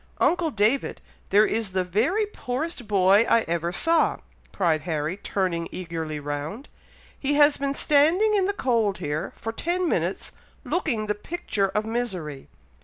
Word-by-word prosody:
"Uncle 345 Hz, -2 st, +2 dB
David! 225 Hz, +2 st, +1 dB, 0.3 s
there 205 Hz, +2 st, +5 dB
is 220 Hz, -4 st, -1 dB
the 185 Hz, -1 st, +1 dB
very 240 Hz, -, +1 dB
poorest 270 Hz, -, -5 dB
boy 200 Hz, +1 st, +5 dB
I 230 Hz, -, +5 dB
ever 170 Hz, -2 st, -2 dB
saw!" 330 Hz, -, +2 dB, 0.3 s
cried 165 Hz, -5 st, +1 dB
Harry, 155 Hz, 0 st, -2 dB
turning 185 Hz, -4 st, -2 dB
eagerly 165 Hz, -4 st, -4 dB
round; 145 Hz, -, -5 dB, 0.5 s
"he 285 Hz, +1 st, 0 dB
has 290 Hz, 0 st, +5 dB
been 280 Hz, 0 st, -2 dB
standing 325 Hz, +11 st, +4 dB
in 390 Hz, -2 st, +2 dB
the 405 Hz, -, 0 dB
cold 230 Hz, -, +1 dB
here, 150 Hz, -1 st, -3 dB
for 225 Hz, -, -5 dB
ten 350 Hz, +9 st, -1 dB
minutes, -, -, -1 dB, 0.3 s
looking 250 Hz, -12 st, -1 dB
the 210 Hz, -, 0 dB
picture 210 Hz, -, -2 dB
of 210 Hz, +3 st, -2 dB
misery! 185 Hz, -, -4 dB
215 Hz, 150 wpm, -25 LUFS, 180-290 Hz, 0.5 s, there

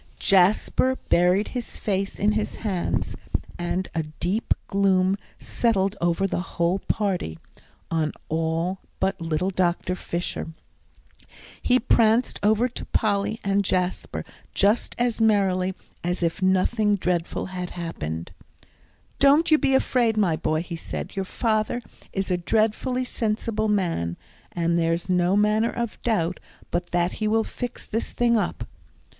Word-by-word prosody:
Jasper 200 Hz, +7 st, +3 dB
buried 180 Hz, +4 st, +3 dB
his 245 Hz, -2 st, -5 dB
face 195 Hz, -1 st, -1 dB
in 205 Hz, +2 st, +3 dB
his 215 Hz, 0 st, -1 dB
hands, 185 Hz, -4 st, -1 dB, 0.4 s
and 175 Hz, +1 st, -1 dB
a 165 Hz, -, 0 dB
deep 175 Hz, +8 st, -1 dB
gloom 195 Hz, -1 st, +3 dB, 0.2 s
settled 200 Hz, -4 st, +1 dB
over 175 Hz, +2 st, +2 dB
the 195 Hz, -, -1 dB
whole 180 Hz, 0 st, 0 dB
party, 185 Hz, -, -1 dB, 0.5 s
on 160 Hz, -2 st, +1 dB, 0.2 s
all 165 Hz, +3 st, -1 dB, 0.2 s
but 190 Hz, -1 st, 0 dB
little 165 Hz, +3 st, 0 dB
Dr. 180 Hz, 0 st, 0 dB
Fisher. 170 Hz, -2 st, -3 dB, 1.1 s
He 250 Hz, -, +4 dB
pranced 230 Hz, 0 st, +3 dB
over 220 Hz, +4 st, +3 dB
to 250 Hz, -, -7 dB
Polly 210 Hz, 0 st, 0 dB
and 200 Hz, 0 st, +2 dB
Jasper 185 Hz, -1 st, -1 dB, 0.3 s
just 205 Hz, +4 st, +2 dB
as 240 Hz, -2 st, 0 dB
merrily 190 Hz, -4 st, +2 dB, 0.3 s
as 175 Hz, +1 st, -1 dB
if 170 Hz, +4 st, -1 dB
nothing 205 Hz, +3 st, +3 dB
dreadful 180 Hz, -3 st, -1 dB
had 180 Hz, -1 st, -4 dB
happened. 85 Hz, -, -5 dB, 0.9 s
"Don't 290 Hz, +4 st, +5 dB
you 310 Hz, -, +6 dB
be 270 Hz, -, +3 dB
afraid, 240 Hz, -4 st, +2 dB
my 185 Hz, -6 st, +3 dB
boy," 155 Hz, +1 st, 0 dB
he 175 Hz, -1 st, -6 dB
said; 165 Hz, -, -6 dB
"your 195 Hz, -1 st, -1 dB
father 215 Hz, +3 st, 0 dB, 0.3 s
is 195 Hz, -1 st, -2 dB
a 180 Hz, -, +2 dB
dreadfully 220 Hz, +7 st, +1 dB
sensible 220 Hz, -2 st, -1 dB
man, 170 Hz, -, 0 dB, 0.3 s
and 170 Hz, 0 st, +1 dB
there's 165 Hz, +2 st, 0 dB
no 180 Hz, +1 st, +3 dB
manner 210 Hz, +2 st, +3 dB
of 235 Hz, -2 st, -4 dB
doubt 185 Hz, -7 st, 0 dB, 0.3 s
but 175 Hz, 0 st, -1 dB
that 175 Hz, 0 st, +1 dB
he 215 Hz, -, -2 dB
will 225 Hz, +1 st, +3 dB
fix 245 Hz, +2 st, -6 dB
this 225 Hz, -, -3 dB
thing 240 Hz, -1 st, +3 dB
up." 215 Hz, -, -1 dB
195 Hz, 140 wpm, -25 LUFS, 175-220 Hz, 1.1 s, you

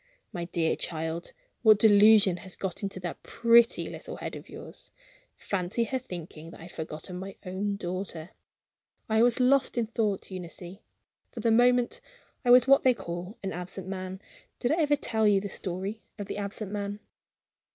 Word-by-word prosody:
"My 175 Hz, -3 st, -3 dB
dear 170 Hz, -2 st, 0 dB
child, 160 Hz, +1 st, -4 dB, 0.3 s
what 215 Hz, -3 st, +7 dB
delusion 205 Hz, -3 st, +6 dB
has 185 Hz, -1 st, -8 dB
got 190 Hz, -3 st, -4 dB
into 195 Hz, -2 st, -4 dB
that 175 Hz, -1 st, -5 dB
pretty 235 Hz, 0 st, +4 dB
little -, -, -7 dB
head -, -, -6 dB
of -, -, -10 dB
yours? -, -, -10 dB, 0.5 s
Fancy 195 Hz, +4 st, -1 dB
her 260 Hz, +3 st, -2 dB
thinking 170 Hz, -8 st, -8 dB
that -, -, -12 dB
I -, -, -10 dB
had 175 Hz, -, -10 dB
forgotten 160 Hz, +3 st, -7 dB
my 195 Hz, +1 st, -7 dB
own 195 Hz, +2 st, -2 dB
daughter! 180 Hz, -3 st, -5 dB, 0.8 s
I 220 Hz, 0 st, +3 dB
was 240 Hz, +1 st, +4 dB
lost 260 Hz, 0 st, +3 dB
in 235 Hz, -, +2 dB
thought, 215 Hz, -4 st, -2 dB
Eunice. 180 Hz, 0 st, -7 dB, 0.5 s
For -, -, -9 dB
the 230 Hz, -, +2 dB
moment, 245 Hz, +1 st, +3 dB, 0.4 s
I 245 Hz, -, 0 dB
was 250 Hz, +1 st, +7 dB
what 275 Hz, 0 st, +6 dB
they 255 Hz, -2 st, +4 dB
call 175 Hz, +1 st, -6 dB
an 195 Hz, -, -3 dB
absent 180 Hz, +2 st, -6 dB
man. 190 Hz, 0 st, -5 dB, 0.4 s
Did 245 Hz, -, 0 dB
I 330 Hz, +2 st, +2 dB
ever 295 Hz, -1 st, +3 dB
tell 220 Hz, -6 st, +1 dB
you 200 Hz, -1 st, +5 dB
the 200 Hz, +1 st, -5 dB
story 195 Hz, +5 st, -4 dB, 0.2 s
of 205 Hz, -, -5 dB
the -, -, -5 dB
absent 200 Hz, 0 st, -5 dB
man? 205 Hz, 0 st, -4 dB
200 Hz, 175 wpm, -28 LUFS, 180-230 Hz, 0.8 s, what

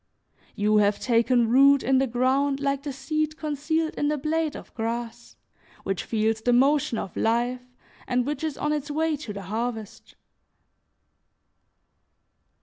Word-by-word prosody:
You 210 Hz, 0 st, +2 dB
have 205 Hz, 0 st, +3 dB
taken 235 Hz, 0 st, +2 dB
root 275 Hz, +3 st, +5 dB
in 265 Hz, 0 st, +3 dB
the 270 Hz, -, +1 dB
ground 265 Hz, +3 st, +1 dB
like 280 Hz, -1 st, -1 dB
the 285 Hz, 0 st, -5 dB
seed 305 Hz, +3 st, -2 dB
concealed 315 Hz, +1 st, -1 dB
in 290 Hz, -, -1 dB
the 300 Hz, 0 st, 0 dB
blade 310 Hz, +1 st, -1 dB
of -, -, -11 dB
grass 235 Hz, +1 st, -5 dB, 0.5 s
which 195 Hz, -1 st, -3 dB
feels 220 Hz, 0 st, 0 dB
the 245 Hz, -, +1 dB
motion 270 Hz, -1 st, +3 dB
of 190 Hz, -, -5 dB
life, 240 Hz, +2 st, 0 dB, 0.5 s
and 250 Hz, -1 st, +1 dB
which 295 Hz, +3 st, -3 dB
is 310 Hz, -3 st, -3 dB
on 300 Hz, 0 st, -1 dB
its 295 Hz, 0 st, -3 dB
way 315 Hz, +1 st, 0 dB
to 275 Hz, -7 st, -7 dB
the 200 Hz, -1 st, -7 dB
harvest. 220 Hz, +1 st, -5 dB
260 Hz, 145 wpm, -25 LUFS, 230-295 Hz, 0.5 s, root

